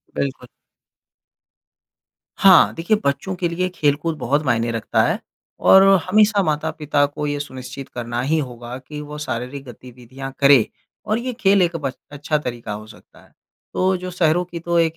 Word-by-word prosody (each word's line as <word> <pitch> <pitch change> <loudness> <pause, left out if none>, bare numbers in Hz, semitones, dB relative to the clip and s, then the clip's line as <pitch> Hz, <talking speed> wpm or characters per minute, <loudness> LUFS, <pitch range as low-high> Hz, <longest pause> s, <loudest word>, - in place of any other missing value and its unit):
बिल्कुल। 130 -2 -3 1.9
हाँ। 100 - +6
देखिए, 175 +6 +1
बच्चों 165 +7 -1
के 180 -1 -1
लिए 180 +2 -1
खेलकूद 150 +2 0
बहुत 145 +3 0
मायने 115 -2 +1
रखता 115 -2 0
है - - -1 0.4
और 190 0 +7 0.3
हमेशा 210 0 +4
माता-पिता 150 -2 0
को 145 +1 -5
ये 145 0 -2
सुनिश्चित 130 -1 -8
करना 120 0 -4
ही 150 +5 +1
होगा 120 -3 -6
कि 150 +3 -9
वो 150 0 -8
शारीरिक 135 -1 -5
गतिविधियाँ 125 +2 -10
करें। 140 -4 +6 0.4
और 215 - 0
ये 250 +2 -3
खेल 200 -4 +3
एक 175 -1 +1
बस 140 -5 -4
अच्छा 150 +1 -1
तरीका 120 -6 -5
हो 105 +1 -7
सकता 110 - -17
है। - - -24 0.4
तो 185 +1 +2
जो 185 +1 -6
शहरों 175 -1 +2
की 170 -1 -7
तो 170 +1 -1
एक 165 -1 +2
145 Hz, 165 wpm, -21 LUFS, 125-170 Hz, 1.9 s, और